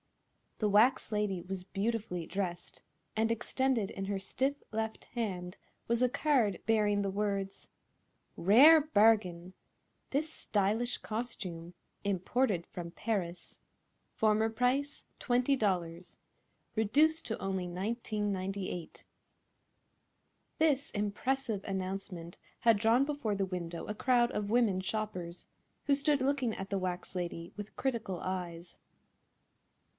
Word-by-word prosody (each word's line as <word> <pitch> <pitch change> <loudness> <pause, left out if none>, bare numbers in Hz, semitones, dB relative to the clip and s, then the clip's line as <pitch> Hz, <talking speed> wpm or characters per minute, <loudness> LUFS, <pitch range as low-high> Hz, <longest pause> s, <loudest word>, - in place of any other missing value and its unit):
The 210 - +1
wax 220 +7 +4
lady 210 -4 0
was 185 +1 -5
beautifully 195 -2 -2
dressed, 180 -2 -4 0.3
and 225 +1 +2
extended 240 -1 0
in 195 - -4
her 200 0 -1
stiff 270 +8 -1
left 220 0 -3
hand 190 -6 -4 0.3
was 235 +1 +1
a 250 - +4
card 265 -7 +2
bearing 210 -2 +3
the 200 - 0
words: 195 -1 -2 0.7
"RARE 275 - +8
BARGIN! 205 - +3 0.6
This 305 +3 -1
Stylish 215 +3 0
Costume 185 -7 -5 0.3
(Imported 200 0 +1
from 170 -1 -7
Paris) 180 -4 -3 0.6
Former 220 0 +3
Price, 255 +5 0
$20, 200 -10 0 0.6
REDUCED 295 +9 +3
TO 225 - -3
ONLY 190 -2 -2
$19.98." 195 -2 -3 1.6
This 290 -3 +3
impressive 210 +1 -1
announcement 190 -3 -4 0.2
had 230 -3 +5
drawn 230 +5 +4
before 285 -8 -1
the 195 -1 0
window 170 -2 -4
a 210 - -3
crowd 245 +1 +3
of 205 0 -2
women 225 -6 +3
shoppers, 185 -4 -4 0.4
who 285 - +3
stood 285 0 +2
looking 260 -4 +1
at 195 0 -6
the 200 - 0
wax 180 0 -4
lady 170 -1 -4
with 205 0 -8
critical 230 -8 -2
eyes. 175 -2 -5
210 Hz, 115 wpm, -32 LUFS, 185-240 Hz, 1.6 s, RARE